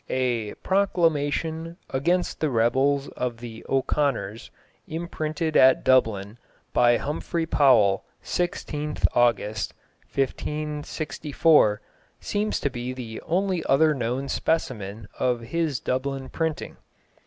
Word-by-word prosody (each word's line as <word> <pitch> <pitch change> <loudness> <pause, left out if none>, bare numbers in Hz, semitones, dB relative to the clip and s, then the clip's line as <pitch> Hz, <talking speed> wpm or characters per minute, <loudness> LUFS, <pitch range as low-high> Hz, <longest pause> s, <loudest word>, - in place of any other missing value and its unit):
A 120 -5 -1
"Proclamation... 165 -3 0
against 175 +7 0
the 155 - +1
rebels 135 +4 +2
of 125 -2 -3
the 115 -1 -9
O'Conors.... 130 -6 0 0.4
Imprynted 160 -1 -3
at 130 0 +6
Dublyn, 110 -5 +2 0.4
by 120 -1 +5
Humfrey 165 +3 -2
Powell, 115 -11 +4 0.2
16th 150 -4 -2
August, 110 -3 +1 0.4
1564," 150 -3 +1 0.4
seems 210 +1 -1
to 140 - 0
be 125 +1 -4
the 120 -3 -7
only 185 0 0
other 155 +3 +4
known 130 +1 -2
specimen 110 -12 -2
of 125 -2 +1
his 155 +1 -1
Dublin 135 +2 -2
printing. 160 -2 -3
135 Hz, 100 wpm, -25 LUFS, 120-160 Hz, 0.4 s, at